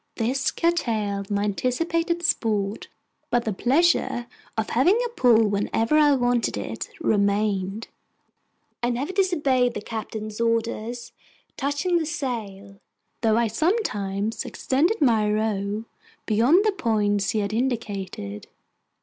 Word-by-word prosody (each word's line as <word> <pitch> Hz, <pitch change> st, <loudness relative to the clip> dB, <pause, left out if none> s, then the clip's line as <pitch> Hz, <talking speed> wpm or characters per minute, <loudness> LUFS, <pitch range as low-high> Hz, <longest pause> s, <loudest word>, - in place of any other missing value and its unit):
This 255 Hz, +4 st, 0 dB
curtailed 220 Hz, -, -1 dB
my 205 Hz, 0 st, 0 dB
anticipated 330 Hz, -, -1 dB
sport, 215 Hz, -, 0 dB, 0.4 s
but 240 Hz, 0 st, +1 dB
the 220 Hz, -, -1 dB
pleasure 260 Hz, -, +2 dB, 0.3 s
of 220 Hz, -, -1 dB
having 340 Hz, -, +4 dB
a -, -, -2 dB
pull 245 Hz, -, +4 dB
whenever 210 Hz, +5 st, 0 dB
I 300 Hz, -1 st, +5 dB
wanted 245 Hz, -2 st, +1 dB
it -, -, -5 dB
remained. 205 Hz, -, 0 dB, 0.9 s
I 240 Hz, -, +1 dB
never 270 Hz, +9 st, -2 dB
disobeyed 285 Hz, -11 st, +2 dB
the 210 Hz, -, -3 dB
Captain's 215 Hz, 0 st, -5 dB
orders 230 Hz, +1 st, -1 dB, 0.4 s
touching 290 Hz, +6 st, 0 dB
the 320 Hz, -, -2 dB
sail, 210 Hz, -, -5 dB, 0.4 s
though 225 Hz, -2 st, +3 dB
I 235 Hz, -, +3 dB
sometimes 220 Hz, -, -1 dB
extended 330 Hz, +10 st, 0 dB
my 220 Hz, -6 st, +3 dB
row 210 Hz, 0 st, -1 dB, 0.4 s
beyond 250 Hz, -, +4 dB
the 430 Hz, -, +4 dB
points 205 Hz, -, 0 dB
he 215 Hz, -, 0 dB
had 200 Hz, +1 st, -3 dB
indicated. 200 Hz, -, -3 dB
230 Hz, 120 wpm, -24 LUFS, 210-280 Hz, 0.9 s, I